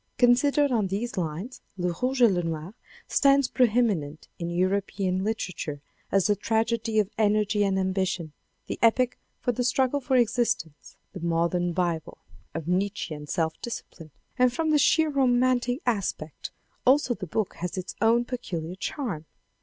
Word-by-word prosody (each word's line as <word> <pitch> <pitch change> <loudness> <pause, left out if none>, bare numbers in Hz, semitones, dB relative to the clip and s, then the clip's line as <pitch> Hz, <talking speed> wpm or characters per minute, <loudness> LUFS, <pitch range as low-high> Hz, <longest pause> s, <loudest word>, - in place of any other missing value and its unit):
Considered 275 +4 +4
on 220 -5 +2
these 210 +6 -3
lines 180 +7 -4 0.2
Le 180 -1 -1
Rouge 255 0 +2
et 230 - +7
Le 175 -2 +1
Noir 165 +2 -4 0.3
stands 275 -1 +4
pre 250 0 +3
eminent 190 -11 0
in 170 -1 -3
European 185 +1 0
literature 180 -8 -3 0.3
as 195 -2 +3
the 205 - +3
tragedy 225 +1 0
of 210 -1 +2
energy 210 -1 +2
and 195 -1 +1
ambition, 185 -4 -1 0.3
the - - -5
epic 245 +2 +3 0.3
of 245 -2 0
the 250 - +1
struggle 260 +3 +2
for 265 -1 0
existence, 230 - 0 0.2
the 190 - -7
modern 170 +1 0
Bible 170 -2 -2 0.4
of 165 -2 -4
Nietzchean 180 -5 -2
self 160 -3 0
discipline. 170 -8 -7 0.3
And 250 -1 +5
from 320 +4 0
the 300 - +4
sheer 315 +2 +4
romantic 255 0 +2
aspect 195 -9 -2 0.3
also 260 -1 +4
the 200 -5 -7
book 210 +5 -1
has 180 +2 -4
its 185 0 -4
own 235 +1 +4
peculiar 180 -10 -4
charm. 190 - -4
205 Hz, 155 wpm, -26 LUFS, 175-245 Hz, 0.4 s, et